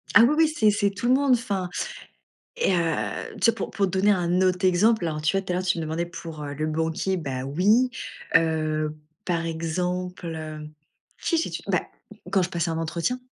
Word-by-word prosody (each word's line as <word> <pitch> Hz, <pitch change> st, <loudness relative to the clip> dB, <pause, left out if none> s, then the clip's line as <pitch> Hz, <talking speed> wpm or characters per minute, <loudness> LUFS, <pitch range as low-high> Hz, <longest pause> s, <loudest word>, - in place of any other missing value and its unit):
Ah 225 Hz, -, +10 dB
oui 270 Hz, +5 st, +5 dB
oui, 320 Hz, -1 st, +6 dB
c'est 220 Hz, -9 st, +3 dB
c'est 205 Hz, 0 st, +2 dB
tout 200 Hz, +5 st, -4 dB
le 255 Hz, -, +5 dB
monde, 275 Hz, -1 st, +4 dB
enfin, 200 Hz, -6 st, -1 dB, 0.9 s
et 475 Hz, -, +2 dB
heu, 170 Hz, -2 st, +1 dB, 0.5 s
tu 230 Hz, -, +5 dB
vois? -, -, -11 dB
Pour -, -, -4 dB
pour 200 Hz, -2 st, +1 dB
te 185 Hz, -, -4 dB
donner 195 Hz, +2 st, +3 dB
un 180 Hz, -1 st, +1 dB
autre 185 Hz, 0 st, +2 dB
exemple, 185 Hz, +1 st, +3 dB
alors 155 Hz, -1 st, -3 dB
tu 155 Hz, +5 st, +1 dB
vois? -, -, +1 dB
Tout 185 Hz, -, -4 dB
à -, -, 0 dB
l'heure, 185 Hz, -, -1 dB
tu 180 Hz, -, +1 dB
me 165 Hz, -, -2 dB
demandais 160 Hz, +2 st, -2 dB
pour, 165 Hz, -3 st, -8 dB
heu, 145 Hz, 0 st, -5 dB
le 155 Hz, +1 st, -1 dB
banquier, 160 Hz, +4 st, -1 dB
bah 130 Hz, -5 st, -4 dB
oui. 205 Hz, -, +3 dB, 0.5 s
Heu, 155 Hz, -1 st, +2 dB, 0.3 s
par 170 Hz, -2 st, 0 dB
exemple, 180 Hz, +3 st, -3 dB
heu, 155 Hz, -1 st, -6 dB, 0.5 s
qui 335 Hz, -, +1 dB
j'ai 325 Hz, -, -1 dB
tu -, -, -5 dB
beh, -, -, +2 dB, 0.5 s
quand 195 Hz, -, +4 dB
je 175 Hz, -, -1 dB
passais 170 Hz, -1 st, -1 dB
un 160 Hz, -, -2 dB
entretien 170 Hz, +10 st, -1 dB
180 Hz, 215 wpm, -25 LUFS, 160-200 Hz, 0.9 s, Ah